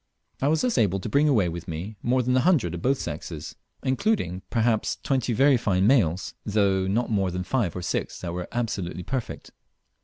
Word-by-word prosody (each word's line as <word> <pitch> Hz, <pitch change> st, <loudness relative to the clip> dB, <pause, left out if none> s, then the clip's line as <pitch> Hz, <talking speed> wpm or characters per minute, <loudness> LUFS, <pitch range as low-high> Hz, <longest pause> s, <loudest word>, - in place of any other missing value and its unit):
I 135 Hz, -, +2 dB
was 155 Hz, +2 st, +2 dB
thus 250 Hz, -2 st, +1 dB
able 95 Hz, -3 st, +2 dB
to 95 Hz, -, -5 dB
bring 145 Hz, +6 st, +3 dB
away 110 Hz, -10 st, +3 dB
with 85 Hz, +1 st, -6 dB
me 90 Hz, +6 st, -5 dB
more 125 Hz, +1 st, +2 dB
than 125 Hz, +1 st, +1 dB
a -, -, +5 dB
hundred 130 Hz, -, +2 dB
of 85 Hz, -, -5 dB
both 135 Hz, +6 st, +2 dB
sexes, 80 Hz, -3 st, -6 dB, 0.3 s
including 130 Hz, -, 0 dB
perhaps 115 Hz, -1 st, +1 dB
twenty 130 Hz, -3 st, 0 dB
very 135 Hz, +4 st, +4 dB
fine 95 Hz, -4 st, +1 dB
males, 100 Hz, -, +2 dB
though 100 Hz, -3 st, +1 dB
not 115 Hz, +5 st, 0 dB
more 100 Hz, -3 st, +1 dB
than 90 Hz, +1 st, -3 dB
five 100 Hz, -3 st, -1 dB
or 90 Hz, -, -4 dB
six -, -, -2 dB
that 85 Hz, -2 st, -4 dB
were 90 Hz, 0 st, -4 dB
absolutely 100 Hz, -8 st, -3 dB
perfect. 130 Hz, +4 st, -5 dB
105 Hz, 195 wpm, -25 LUFS, 90-130 Hz, 0.3 s, a